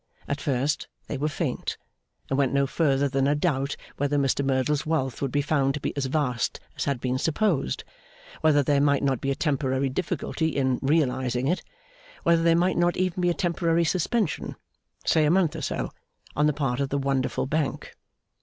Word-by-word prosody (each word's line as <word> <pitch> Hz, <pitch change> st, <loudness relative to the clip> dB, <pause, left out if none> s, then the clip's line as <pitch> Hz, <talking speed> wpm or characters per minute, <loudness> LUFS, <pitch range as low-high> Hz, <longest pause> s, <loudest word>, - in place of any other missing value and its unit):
At 145 Hz, 0 st, -2 dB
first 140 Hz, +1 st, 0 dB, 0.2 s
they -, -, -4 dB
were 145 Hz, +2 st, -1 dB
faint, -, -, -3 dB, 0.5 s
and 135 Hz, -, -1 dB
went 135 Hz, -1 st, +2 dB
no 140 Hz, 0 st, +3 dB
further 140 Hz, -1 st, +1 dB
than 135 Hz, 0 st, +1 dB
a 145 Hz, -, +3 dB
doubt 145 Hz, -3 st, 0 dB, 0.2 s
whether 145 Hz, +1 st, +1 dB
Mr 140 Hz, 0 st, +1 dB
Merdle's 135 Hz, +2 st, +1 dB
wealth 155 Hz, -5 st, -1 dB
would 135 Hz, -2 st, -1 dB
be 145 Hz, +1 st, +1 dB
found 140 Hz, -2 st, +1 dB
to -, -, -3 dB
be -, -, -3 dB
as 140 Hz, -2 st, -1 dB
vast 130 Hz, -6 st, -1 dB, 0.2 s
as -, -, -2 dB
had 140 Hz, -3 st, 0 dB
been 130 Hz, +1 st, -1 dB
supposed; 160 Hz, -, 0 dB, 0.6 s
whether 150 Hz, -2 st, +4 dB
there 140 Hz, +1 st, +2 dB
might 140 Hz, -1 st, +3 dB
not 135 Hz, -3 st, +1 dB
be 135 Hz, -, -1 dB
a 135 Hz, -, +1 dB
temporary 135 Hz, -3 st, 0 dB
difficulty 160 Hz, +1 st, -2 dB
in 130 Hz, -5 st, 0 dB
'realising' 130 Hz, -4 st, +1 dB
it; 175 Hz, +5 st, +1 dB, 0.6 s
whether 170 Hz, 0 st, +4 dB
there 165 Hz, 0 st, +4 dB
might 180 Hz, +2 st, +2 dB
not 175 Hz, 0 st, +2 dB
even 185 Hz, 0 st, 0 dB
be 175 Hz, -, +3 dB
a 175 Hz, -, +1 dB
temporary 170 Hz, -1 st, +1 dB
suspension 185 Hz, +3 st, 0 dB, 0.5 s
(say 160 Hz, -, +4 dB
a 150 Hz, -, +3 dB
month 170 Hz, -2 st, +3 dB
or 160 Hz, -, -5 dB
so), -, -, -2 dB, 0.4 s
on 150 Hz, +1 st, +3 dB
the -, -, +4 dB
part 135 Hz, -3 st, -1 dB
of 140 Hz, -1 st, 0 dB
the 140 Hz, -, 0 dB
wonderful 135 Hz, -2 st, 0 dB
Bank. 150 Hz, +1 st, -2 dB
145 Hz, 190 wpm, -26 LUFS, 135-160 Hz, 0.6 s, whether